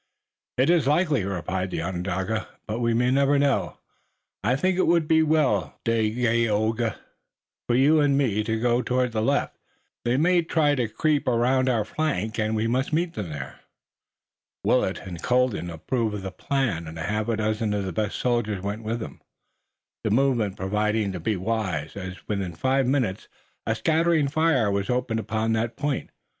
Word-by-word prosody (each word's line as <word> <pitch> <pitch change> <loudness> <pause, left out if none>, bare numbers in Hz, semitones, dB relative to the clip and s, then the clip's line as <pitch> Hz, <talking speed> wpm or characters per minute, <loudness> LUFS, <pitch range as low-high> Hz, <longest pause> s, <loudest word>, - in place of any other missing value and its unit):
"It 130 +6 +4
is 165 -6 +3
likely," 150 - +2
replied 95 0 -2
the 80 - -3
Onondaga, 95 +4 -2 0.2
"but 110 +2 -3
we 115 -1 +1
may 125 +2 +2
never 140 +1 +3
know. 140 -1 +1 0.7
I 125 - +2
think 185 +7 +1
it - - +3
would 170 -2 +3
be 160 0 +4
well, 150 - +1
Dagaeoga, 115 -1 +1 0.7
for 120 - +2
you 145 +5 +5
and 140 -1 +3
me 110 -7 +1
to 110 0 -1
go 120 +1 +2
toward 125 -1 0
the 110 -1 -1
left. 140 +5 0 0.4
They 120 +2 +1
may 175 +4 +4
try 160 -3 +2
to 125 -5 0
creep 150 +6 0
around 125 +2 +2
our 115 -4 +1
flank, 110 -6 -2
and 110 0 0
we 110 +1 0
must 125 +4 0
meet 165 +2 0
them 100 -6 -5
there." 70 -3 -7 1.0
Willet - - +2
and 85 -3 -7
Colden 125 -8 +1
approved 110 +7 -2
of 100 - -5
the 95 - -4
plan, 115 - -1
and 80 +1 -8
a 80 - -4
half 105 +4 -1
dozen 110 -1 0
of 100 -1 -2
the 95 - -4
best 105 +3 -1
soldiers 110 -6 0
went 100 +2 -3
with 115 +1 -3
them, 110 - -8 0.8
the - - 0
movement 115 -4 +1
proving 105 +2 0
to 90 - -5
be 105 +6 -1
wise, 90 -7 -2
as 95 -1 -8
within 95 -5 -3
five 130 +7 +1
minutes 125 -8 0 0.4
a 115 - +1
scattering 160 +2 +2
fire 150 -8 +2
was 100 0 -1
opened 125 -2 0
upon 110 0 -1
that 115 +1 -1
point. 145 -2 -2
115 Hz, 175 wpm, -25 LUFS, 105-135 Hz, 1.0 s, you